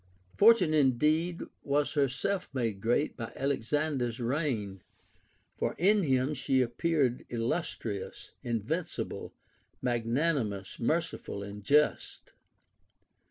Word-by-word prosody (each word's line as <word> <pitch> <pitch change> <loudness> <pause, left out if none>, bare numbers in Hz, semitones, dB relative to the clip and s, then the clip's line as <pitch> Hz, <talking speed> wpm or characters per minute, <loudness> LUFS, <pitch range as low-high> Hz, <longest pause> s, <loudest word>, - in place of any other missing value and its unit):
Fortune 205 -7 +5
indeed 155 +5 +2 0.2
was 145 +1 0
herself 150 +7 0
made 115 -6 -1
great 120 +7 +1
by 115 -2 -6
Alexander's 135 -2 -1
reign; 120 - -2 0.7
for - - -2
in 205 +4 +4
him 135 -2 +1
she 135 -1 +1
appeared 130 +1 0
illus 120 +9 -1
trious, 100 -4 -6
invincible, 120 - -3 0.5
magnanimous, 120 - -1
merciful, 155 -6 -2
and 100 0 -8
just. 150 +7 +1
135 Hz, 95 wpm, -30 LUFS, 115-155 Hz, 0.7 s, Fortune